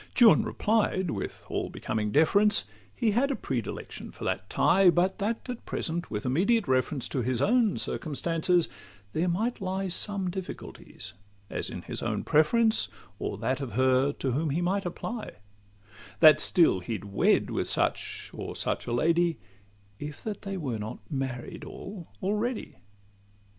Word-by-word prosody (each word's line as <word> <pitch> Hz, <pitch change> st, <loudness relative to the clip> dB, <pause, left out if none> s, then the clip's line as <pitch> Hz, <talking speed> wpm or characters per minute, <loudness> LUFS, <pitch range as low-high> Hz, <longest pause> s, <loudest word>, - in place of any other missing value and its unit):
Juan 235 Hz, -3 st, +8 dB
replied, 205 Hz, -5 st, +1 dB
with -, -, -5 dB
all -, -, -2 dB
becoming 105 Hz, -1 st, -2 dB
deference, 200 Hz, -, +4 dB, 0.3 s
He 220 Hz, -, +2 dB
had 250 Hz, +7 st, +2 dB
a 275 Hz, -, 0 dB
predilection 125 Hz, -, -4 dB
for -, -, -11 dB
that -, -, -2 dB
tie; 190 Hz, 0 st, +5 dB
But 180 Hz, +4 st, +2 dB
that, 220 Hz, +5 st, -2 dB
at 250 Hz, -2 st, -5 dB
present, 170 Hz, +1 st, -2 dB
with 105 Hz, -1 st, -4 dB
immediate 200 Hz, -, +2 dB
reference 130 Hz, +1 st, +1 dB
To 130 Hz, -, -1 dB
his 125 Hz, 0 st, 0 dB
own 225 Hz, -, +3 dB
circumstances, 165 Hz, +3 st, 0 dB, 0.5 s
there 165 Hz, +3 st, +1 dB
might 220 Hz, +7 st, -1 dB
lie 190 Hz, 0 st, -2 dB
Some 190 Hz, 0 st, 0 dB
difficulties, 190 Hz, 0 st, -7 dB, 0.4 s
as -, -, -2 dB
in -, -, -7 dB
his -, -, -3 dB
own -, -, -1 dB
preference, 220 Hz, +9 st, +3 dB, 0.3 s
Or -, -, -3 dB
that 130 Hz, +2 st, -1 dB
of 135 Hz, -4 st, -5 dB
her 130 Hz, +2 st, +3 dB
to 135 Hz, -, -2 dB
whom 150 Hz, +5 st, 0 dB
he 145 Hz, +5 st, 0 dB
might 185 Hz, +2 st, 0 dB
apply: 220 Hz, +6 st, -5 dB, 0.9 s
That 155 Hz, -2 st, +8 dB
still 165 Hz, -, +4 dB
he'd 105 Hz, +3 st, -5 dB
wed 100 Hz, -1 st, +2 dB
with -, -, -1 dB
such -, -, -1 dB
or -, -, -6 dB
such -, -, -2 dB
a -, -, -2 dB
lady, 165 Hz, +6 st, +2 dB, 0.6 s
If 145 Hz, 0 st, -7 dB
that 215 Hz, -2 st, -4 dB
they 195 Hz, -1 st, -4 dB
were 130 Hz, -10 st, -3 dB
not 105 Hz, +1 st, -5 dB
married 130 Hz, -3 st, -4 dB
all 190 Hz, -4 st, -8 dB, 0.2 s
already. 210 Hz, +5 st, -1 dB
175 Hz, 155 wpm, -28 LUFS, 135-205 Hz, 0.9 s, Juan